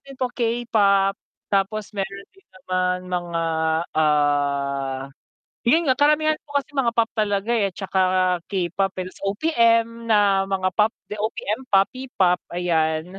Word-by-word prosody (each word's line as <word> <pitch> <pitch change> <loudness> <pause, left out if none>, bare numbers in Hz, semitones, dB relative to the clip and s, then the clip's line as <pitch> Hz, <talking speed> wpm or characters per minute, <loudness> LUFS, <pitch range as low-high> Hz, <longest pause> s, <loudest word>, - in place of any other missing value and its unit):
din 275 -1 -12
po 255 - +1
K-pop, 220 -5 +2 0.4
tapos 200 +2 0
mayro'n 200 0 -5
din 390 - -25
naman 185 0 -1
mga 175 -2 -2 0.6
ah, 140 -3 +1 0.6
'yun 320 +8 +4
nga 255 - +2
karamihan 305 +1 +3
ko 290 -1 -4
kasi 275 - -27
mga 235 -3 +1
pop 230 -1 +2
talaga, 205 0 0
eh,' 200 -5 0
tsaka 190 -1 -2 0.5
K-pop, 190 0 -1
ta's 185 0 -7
OPM 230 -1 +1
na 200 -3 +3
mga 190 -1 0
pop, 215 +1 +4 0.2
the 210 - -5
OPM 220 +3 -3
P-pop, 195 -3 +2 0.2
ayan. 165 0 -1
200 Hz, 130 wpm, -22 LUFS, 180-230 Hz, 0.6 s, yun